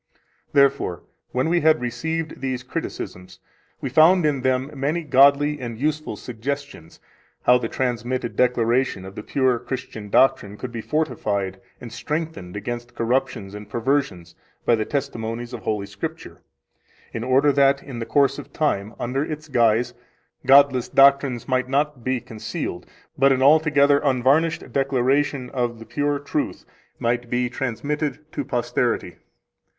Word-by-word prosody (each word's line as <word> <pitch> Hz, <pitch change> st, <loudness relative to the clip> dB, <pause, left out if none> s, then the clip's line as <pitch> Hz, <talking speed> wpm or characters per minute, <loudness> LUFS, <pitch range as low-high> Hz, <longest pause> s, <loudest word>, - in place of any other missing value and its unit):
13 -, -, -38 dB, 0.3 s
Therefore, 140 Hz, -, +2 dB, 0.3 s
when 130 Hz, +4 st, 0 dB
we 170 Hz, +1 st, +2 dB
had 155 Hz, 0 st, +4 dB
received 155 Hz, +7 st, -3 dB
these 130 Hz, -2 st, -3 dB
criticisms, 90 Hz, -6 st, -6 dB, 0.4 s
we -, -, -2 dB
found 160 Hz, +6 st, +5 dB
in 145 Hz, -3 st, +1 dB
them 130 Hz, +2 st, 0 dB
many 145 Hz, +5 st, -1 dB
godly 145 Hz, +1 st, +4 dB
and 120 Hz, -3 st, -6 dB
useful 150 Hz, -2 st, -2 dB
suggestions 125 Hz, -, -6 dB, 0.4 s
how 125 Hz, 0 st, +5 dB
the 115 Hz, -2 st, -3 dB
transmitted 125 Hz, -1 st, -2 dB
declaration 120 Hz, -4 st, +1 dB
of 95 Hz, -, -9 dB
the 105 Hz, -, -7 dB
pure 130 Hz, 0 st, +1 dB
Christian 120 Hz, -6 st, -6 dB
doctrine 115 Hz, -5 st, +3 dB
could 125 Hz, +2 st, -6 dB
be 115 Hz, -1 st, -5 dB
fortified 105 Hz, -10 st, -2 dB, 0.2 s
and 120 Hz, -2 st, -9 dB
strengthened 150 Hz, -, -4 dB
against 120 Hz, +3 st, -6 dB
corruptions 120 Hz, -4 st, -1 dB
and 105 Hz, 0 st, -9 dB
perversions 120 Hz, -6 st, -1 dB, 0.3 s
by -, -, +4 dB
the 110 Hz, -1 st, +1 dB
testimonies 120 Hz, -3 st, -4 dB
of 120 Hz, -, -5 dB
Holy 105 Hz, -2 st, -2 dB
Scripture, -, -, -7 dB, 0.7 s
in 115 Hz, -, -4 dB
order 135 Hz, +3 st, +4 dB
that 140 Hz, 0 st, +3 dB
in 130 Hz, -4 st, -7 dB
the 115 Hz, -, -5 dB
course 140 Hz, 0 st, +2 dB
of 145 Hz, 0 st, -10 dB
time, 110 Hz, -9 st, -1 dB
under 130 Hz, +4 st, -1 dB
its 155 Hz, 0 st, -6 dB
guise, 120 Hz, -1 st, +2 dB, 0.5 s
godless 135 Hz, -2 st, +5 dB
doctrines 135 Hz, -3 st, +4 dB
might 130 Hz, -1 st, 0 dB
not 140 Hz, -2 st, 0 dB
be 130 Hz, 0 st, 0 dB
concealed, 115 Hz, -2 st, -6 dB, 0.3 s
but 135 Hz, +1 st, +5 dB
an 130 Hz, 0 st, +2 dB
altogether 145 Hz, -1 st, +5 dB
unvarnished 140 Hz, +4 st, +1 dB
declaration 135 Hz, 0 st, +1 dB
of 120 Hz, -3 st, -2 dB
the 115 Hz, -, -11 dB
pure 145 Hz, +2 st, -1 dB
truth 140 Hz, 0 st, -3 dB, 0.3 s
might 120 Hz, 0 st, -1 dB
be 125 Hz, 0 st, 0 dB
transmitted 140 Hz, +5 st, -2 dB
to -, -, -3 dB
posterity. 120 Hz, -5 st, -1 dB
130 Hz, 145 wpm, -23 LUFS, 120-140 Hz, 0.7 s, found